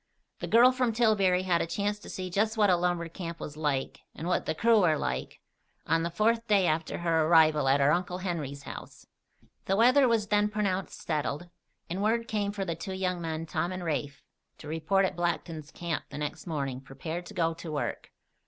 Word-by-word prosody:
The -, -, -4 dB
girl 240 Hz, +3 st, +7 dB
from 250 Hz, -3 st, 0 dB
Tillbury 200 Hz, -5 st, +3 dB
had 175 Hz, -2 st, +2 dB
a -, -, -1 dB
chance 205 Hz, +5 st, -1 dB
to -, -, -12 dB
see 185 Hz, -1 st, -5 dB
just 215 Hz, +4 st, +1 dB
what 205 Hz, -3 st, +4 dB
a -, -, +5 dB
lumber 175 Hz, -1 st, 0 dB
camp 170 Hz, 0 st, -7 dB
was 150 Hz, -, -7 dB
like, 145 Hz, -3 st, -2 dB, 0.2 s
and 165 Hz, -, -5 dB
what 180 Hz, -, 0 dB
the -, -, 0 dB
crew 225 Hz, +3 st, +4 dB
were 160 Hz, -4 st, +3 dB
like, 65 Hz, -, -4 dB, 0.4 s
on 165 Hz, 0 st, +2 dB
the 170 Hz, -, -1 dB
fourth 230 Hz, +6 st, +1 dB
day 200 Hz, -3 st, +4 dB
after 160 Hz, -1 st, 0 dB
her 165 Hz, -2 st, +1 dB
arrival 155 Hz, -4 st, +5 dB
at 135 Hz, +1 st, +4 dB
her 140 Hz, +1 st, +4 dB
Uncle 180 Hz, +2 st, 0 dB
Henry's 155 Hz, -7 st, -4 dB
house. -, -, -10 dB, 0.6 s
The 195 Hz, -, +1 dB
weather 255 Hz, +5 st, +5 dB
was 225 Hz, -3 st, +1 dB
then 210 Hz, 0 st, +3 dB
pronounced 200 Hz, -3 st, -2 dB
settled, 155 Hz, +2 st, -2 dB, 0.4 s
and 180 Hz, +3 st, -3 dB
word 230 Hz, +2 st, +1 dB
came 205 Hz, -2 st, -1 dB
for 200 Hz, -1 st, -3 dB
the 170 Hz, -, -2 dB
two 190 Hz, +4 st, -6 dB
young 185 Hz, -2 st, -2 dB
men, 165 Hz, -1 st, -3 dB
Tom 170 Hz, +2 st, -2 dB
and 185 Hz, -1 st, -5 dB
Rafe, 145 Hz, -3 st, -3 dB, 0.3 s
to -, -, -11 dB
report 165 Hz, +5 st, +1 dB
at 185 Hz, -, -2 dB
Blackton's 165 Hz, -3 st, -3 dB
camp 170 Hz, -2 st, -4 dB
the -, -, -8 dB
next 150 Hz, +4 st, -5 dB
morning, 140 Hz, -5 st, -3 dB
prepared 160 Hz, +6 st, -6 dB
to -, -, -11 dB
go 165 Hz, -2 st, +1 dB
to 165 Hz, 0 st, -8 dB
work. 150 Hz, -, -3 dB
175 Hz, 210 wpm, -29 LUFS, 160-200 Hz, 0.6 s, girl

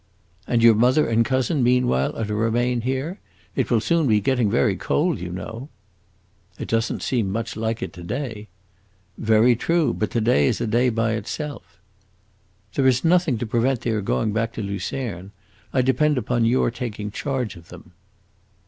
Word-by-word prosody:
"And 115 Hz, -1 st, +1 dB
your 115 Hz, -1 st, +8 dB
mother 125 Hz, +7 st, +3 dB
and 115 Hz, 0 st, +3 dB
cousin, 130 Hz, +4 st, 0 dB
meanwhile, 125 Hz, -, +2 dB
are 110 Hz, -, -2 dB
to 105 Hz, -, -4 dB
remain 120 Hz, +3 st, 0 dB
here? 135 Hz, -, -3 dB, 0.4 s
It -, -, 0 dB
will 120 Hz, -, +3 dB
soon 165 Hz, +5 st, +1 dB
be 105 Hz, -3 st, +4 dB
getting 120 Hz, 0 st, +1 dB
very 110 Hz, -2 st, +2 dB
cold, 155 Hz, -, 0 dB
you 90 Hz, 0 st, -5 dB
know." 115 Hz, -, -7 dB, 0.9 s
"It -, -, -6 dB
does 115 Hz, 0 st, +1 dB
n't -, -, -5 dB
seem 115 Hz, -7 st, 0 dB
much 115 Hz, +2 st, -3 dB
like 110 Hz, +1 st, -2 dB
it 95 Hz, -, -6 dB
to 90 Hz, -, -10 dB
day." 110 Hz, +1 st, -5 dB, 0.7 s
"Very 110 Hz, +2 st, +4 dB
true; 165 Hz, +6 st, +1 dB
but 110 Hz, -, -2 dB
to 120 Hz, -, -1 dB
day 110 Hz, -, +3 dB
is -, -, 0 dB
a -, -, -1 dB
day 120 Hz, +3 st, +2 dB
by 115 Hz, -1 st, 0 dB
itself." 115 Hz, -, -5 dB, 1.0 s
"There 135 Hz, -2 st, +2 dB
is 130 Hz, -1 st, +2 dB
nothing 170 Hz, -6 st, +3 dB
to 120 Hz, -, -3 dB
prevent 120 Hz, +2 st, 0 dB
their 110 Hz, -3 st, -1 dB
going 105 Hz, +2 st, -1 dB
back 115 Hz, +1 st, -1 dB
to 110 Hz, -, -5 dB
Lucerne. 100 Hz, -1 st, -5 dB, 0.4 s
I 130 Hz, -, +2 dB
depend 140 Hz, +3 st, +2 dB
upon 120 Hz, 0 st, 0 dB
your 120 Hz, 0 st, +2 dB
taking 105 Hz, -4 st, -5 dB
charge 130 Hz, -1 st, -3 dB
of 85 Hz, -1 st, -14 dB
them." 90 Hz, -1 st, -13 dB
115 Hz, 180 wpm, -23 LUFS, 110-130 Hz, 1.0 s, your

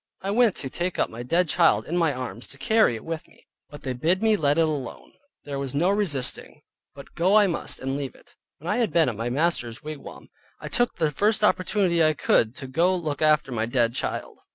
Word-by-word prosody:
I 195 Hz, -, -1 dB
went 225 Hz, -2 st, +3 dB
to 135 Hz, -, -5 dB
take 175 Hz, +6 st, -3 dB
up -, -, 0 dB
my 115 Hz, -, -7 dB
dead 170 Hz, +8 st, +1 dB
child 170 Hz, +2 st, +3 dB
in 170 Hz, -, -4 dB
my 165 Hz, -3 st, +2 dB
arms 125 Hz, -2 st, -6 dB
to 140 Hz, -, -6 dB
carry 220 Hz, -, +3 dB
it 110 Hz, -, -9 dB
with 165 Hz, 0 st, -5 dB
me, -, -, -24 dB, 0.2 s
but 145 Hz, -, -12 dB
they 130 Hz, -, -2 dB
bid 170 Hz, -, 0 dB
me 220 Hz, -1 st, +4 dB
let 145 Hz, -5 st, +1 dB
it -, -, +4 dB
alone; 145 Hz, -5 st, -5 dB, 0.3 s
there 140 Hz, -1 st, -5 dB
was 140 Hz, -1 st, -4 dB
no 175 Hz, +6 st, +2 dB
resisting, 175 Hz, -11 st, -2 dB, 0.3 s
but 140 Hz, -, -12 dB
go 185 Hz, +4 st, +2 dB
I 215 Hz, -1 st, +7 dB
must 175 Hz, -4 st, -2 dB
and 135 Hz, +1 st, -3 dB
leave 140 Hz, -2 st, -5 dB
it. -, -, -20 dB, 0.2 s
When 160 Hz, -, -11 dB
I -, -, 0 dB
had 235 Hz, -4 st, +1 dB
been 165 Hz, -5 st, +3 dB
at 115 Hz, -, -5 dB
my 115 Hz, +3 st, -3 dB
master's 130 Hz, -4 st, -1 dB
wigwam, 155 Hz, -1 st, -9 dB, 0.3 s
I -, -, -7 dB
took 240 Hz, -1 st, 0 dB
the 155 Hz, -2 st, 0 dB
first 210 Hz, +7 st, +1 dB
opportunity 185 Hz, -3 st, +2 dB
I 155 Hz, 0 st, +4 dB
could 115 Hz, -3 st, +2 dB
get 165 Hz, -, -9 dB
to 135 Hz, -, -6 dB
go 170 Hz, +8 st, +2 dB
look 155 Hz, -5 st, -3 dB
after 155 Hz, -3 st, +3 dB
my 115 Hz, -2 st, -1 dB
dead 120 Hz, -1 st, +1 dB
child. -, -, -4 dB
155 Hz, 235 wpm, -25 LUFS, 135-180 Hz, 0.3 s, I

